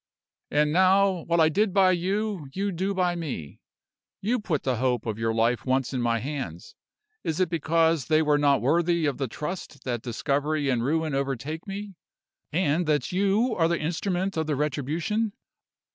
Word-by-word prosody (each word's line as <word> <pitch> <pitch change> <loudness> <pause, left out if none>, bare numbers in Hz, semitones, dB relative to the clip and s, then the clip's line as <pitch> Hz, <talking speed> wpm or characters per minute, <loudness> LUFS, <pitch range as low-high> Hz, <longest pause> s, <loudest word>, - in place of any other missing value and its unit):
"And 150 0 +2
now, 190 0 +4
what 170 0 +2
I 160 - +6
did 200 +5 +1
by 190 -2 +6
you, 190 -1 -1
you 200 +3 -1
do 190 +3 -2
by 180 -2 +1
me. 135 - -6 0.6
You 235 +5 0
put 170 -8 -2
the 130 -3 0
hope 125 0 0
of 110 -1 -3
your 115 0 +1
life 115 +2 +1
once 130 0 0
in 125 - -1
my 115 -1 +1
hands. 125 - -5 0.5
Is 160 - -2
it 185 -3 +2
because 165 -2 +2
they 155 0 +4
were 150 -1 +3
not 140 -3 +3
worthy 170 +4 +2
of 145 -2 -1
the 135 - -1
trust 150 0 -6
that 120 -3 -2
discovery 140 +4 -1
and 120 -3 +1
ruin 155 +3 0
overtake 140 - -3
me, 200 +1 -6 0.6
and 165 0 +1
that 150 -1 +1
you 200 +6 +2
are 165 -2 +3
the 170 0 +1
instrument 180 +3 -2
of 160 -1 -1
the 150 - 0
retribution? 155 - -1
160 Hz, 175 wpm, -26 LUFS, 135-185 Hz, 0.6 s, I